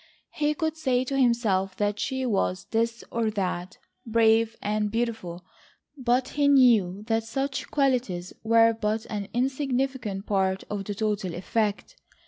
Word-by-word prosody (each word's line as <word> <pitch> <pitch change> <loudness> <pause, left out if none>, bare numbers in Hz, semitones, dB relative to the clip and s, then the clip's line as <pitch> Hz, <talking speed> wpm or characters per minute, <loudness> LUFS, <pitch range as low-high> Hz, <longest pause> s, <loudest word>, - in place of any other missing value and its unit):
He 300 0 0
could 315 +1 -2
say 255 -5 +1
to 275 +2 -3
himself 215 -7 +2
that 205 0 0
she 260 +1 -2
was 195 -4 0
this 230 +1 0
or 230 -1 0
that,—brave 220 +4 0
and 210 0 -1
beautiful, 220 -6 -3 0.5
but 255 -1 +1
he 290 -1 +1
knew 225 -9 +4
that 225 0 0
such 270 +4 -3
qualities 245 -11 0
were 230 0 +5
but 220 0 -2
an 205 -2 -3
insignificant 260 -5 -1
part 190 -1 0
of 200 -1 -3
the 205 - -4
total 205 -4 -2
effect. 205 +3 -2
225 Hz, 135 wpm, -26 LUFS, 205-255 Hz, 0.5 s, were